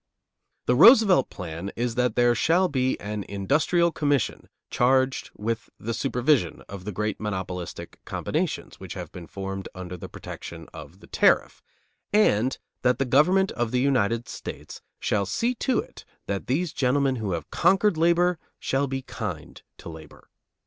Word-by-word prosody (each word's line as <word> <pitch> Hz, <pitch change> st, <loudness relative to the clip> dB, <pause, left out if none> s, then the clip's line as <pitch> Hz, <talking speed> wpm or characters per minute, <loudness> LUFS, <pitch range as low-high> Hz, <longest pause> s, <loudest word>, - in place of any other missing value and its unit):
The 125 Hz, -, +3 dB
Roosevelt 210 Hz, -, +7 dB
plan 90 Hz, +1 st, -6 dB
is 120 Hz, 0 st, -1 dB
that 125 Hz, +1 st, 0 dB
there 120 Hz, 0 st, +4 dB
shall 170 Hz, -, +3 dB
be 130 Hz, -4 st, 0 dB
an 105 Hz, 0 st, -4 dB
industrial 150 Hz, -, +2 dB
commission 145 Hz, -4 st, -1 dB, 0.2 s
charged 130 Hz, +1 st, +2 dB
with 115 Hz, +1 st, -3 dB
the 115 Hz, +2 st, -3 dB
supervision 125 Hz, -, +1 dB
of 95 Hz, -2 st, -9 dB
the 105 Hz, -, -3 dB
great 105 Hz, +1 st, -2 dB
monopolistic 95 Hz, -4 st, -5 dB
combinations -, -, -3 dB
which -, -, -8 dB
have -, -, -7 dB
been 85 Hz, -2 st, -9 dB
formed 95 Hz, -1 st, -6 dB
under 90 Hz, -1 st, -6 dB
the 85 Hz, -, -9 dB
protection -, -, -9 dB
of -, -, -11 dB
the -, -, -13 dB
tariff, -, -, +2 dB, 0.5 s
and 130 Hz, -, +3 dB, 0.2 s
that 125 Hz, -1 st, +2 dB
the 135 Hz, -, 0 dB
government 180 Hz, +10 st, +4 dB
of 120 Hz, -1 st, -1 dB
the 125 Hz, -, 0 dB
United 120 Hz, -4 st, +1 dB
States -, -, -8 dB, 0.2 s
shall 100 Hz, -2 st, 0 dB
see 235 Hz, -, 0 dB
to 250 Hz, 0 st, 0 dB
it -, -, -5 dB, 0.2 s
that 100 Hz, -1 st, -3 dB
these 155 Hz, +6 st, 0 dB
gentlemen 135 Hz, 0 st, +1 dB
who 105 Hz, -5 st, -2 dB
have 80 Hz, -3 st, -5 dB
conquered 195 Hz, +2 st, +3 dB
labor 170 Hz, +1 st, +3 dB, 0.2 s
shall 135 Hz, +1 st, 0 dB
be 135 Hz, 0 st, -4 dB
kind 95 Hz, -, -6 dB, 0.2 s
to -, -, -11 dB
labor. 80 Hz, -1 st, -12 dB
125 Hz, 155 wpm, -25 LUFS, 100-150 Hz, 0.5 s, Roosevelt